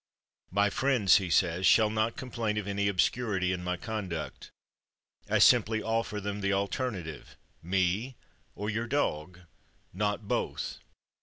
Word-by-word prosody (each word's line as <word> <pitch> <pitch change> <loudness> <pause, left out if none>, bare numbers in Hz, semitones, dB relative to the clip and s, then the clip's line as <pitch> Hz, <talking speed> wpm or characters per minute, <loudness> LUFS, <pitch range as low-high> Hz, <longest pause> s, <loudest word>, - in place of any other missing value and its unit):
"My 100 +2 +2
friends," 125 -7 +4
he 95 -3 -3
says, 90 +1 +2
"shall 110 -2 +5
not 110 +1 0
complain 115 -5 -3
of 105 - -2
any 100 0 0
obscurity 100 -1 +1
in 90 -1 -4
my 90 0 -2
conduct. 95 -5 -5 0.8
I - - +3
simply 110 0 +4
offer 115 -2 -1
them 100 0 -4
the 100 0 +1
alternative, 100 - -3 0.2
me 95 +8 0 0.4
or 105 - -4
your 115 +2 -2
dog 90 - -2 0.5
not 105 +2 -2
both. - - -2
100 Hz, 135 wpm, -29 LUFS, 90-110 Hz, 0.8 s, shall